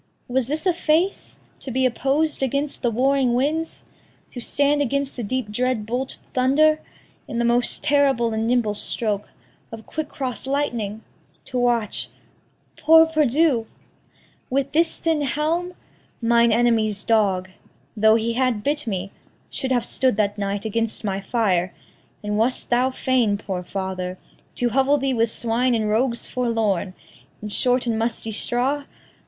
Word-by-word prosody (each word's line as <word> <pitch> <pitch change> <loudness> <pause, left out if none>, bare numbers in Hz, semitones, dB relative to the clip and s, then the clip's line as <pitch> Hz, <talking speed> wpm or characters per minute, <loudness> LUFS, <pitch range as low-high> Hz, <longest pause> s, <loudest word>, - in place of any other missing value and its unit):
Was 250 -1 0
this 305 +5 -2
a 365 - +3
face 335 +3 0 0.2
To - - -8
be 260 +1 +1
oppos'd 275 +5 0
against 280 +2 -1
the 240 - +2
warring 255 +1 +2
winds? 310 +6 -1 0.5
To 245 - -7
stand 285 +4 +1
against 280 +1 -1
the 245 - -4
deep 235 0 -3
dread 245 -1 -1
bolted 250 +4 -3 0.2
thunder? 300 +5 +3 0.5
In 235 - -5
the 235 - +1
most 240 +1 +2
terrible 270 -5 +2
and 220 +1 -1
nimble 235 -3 +1
stroke 210 -1 -3 0.4
Of 225 -1 -9
quick 315 -1 -4
cross 260 -3 -5
lightning? 235 -7 -2 0.4
to 250 - -3
watch 240 -4 0 0.7
poor 320 +1 +7
perdu! 300 -5 +2 0.8
With 275 +1 0
this 330 +2 +2
thin 320 -2 0
helm? 325 +6 -1 0.4
Mine 235 0 +3
enemy's 220 -3 +2
dog, 195 -5 +1 0.4
Though 220 0 +5
he 230 +1 0
had 250 -4 0
bit 295 -2 -1
me, 195 -2 -3 0.4
should 265 -2 -3
have 245 -2 +2
stood 255 -5 +1
that 205 -1 +1
night 200 0 -3
Against 225 +1 -2
my 195 -2 -2
fire; 190 -6 0 0.5
and 210 0 -1
wast 245 +3 0
thou 250 +2 +3
fain, 255 -5 +1
poor 190 -3 -4
father, 185 -1 -4 0.4
To 245 - +1
hovel 270 +4 +3
thee 270 -1 0
with 230 -1 +2
swine 235 +2 0
and 220 -2 0
rogues 235 +3 0
forlorn, 220 -7 -1 0.5
In 210 - -4
short 250 +4 +1
and 225 -2 0
musty 225 -1 -2
straw? 260 +6 0
245 Hz, 150 wpm, -22 LUFS, 220-275 Hz, 0.8 s, poor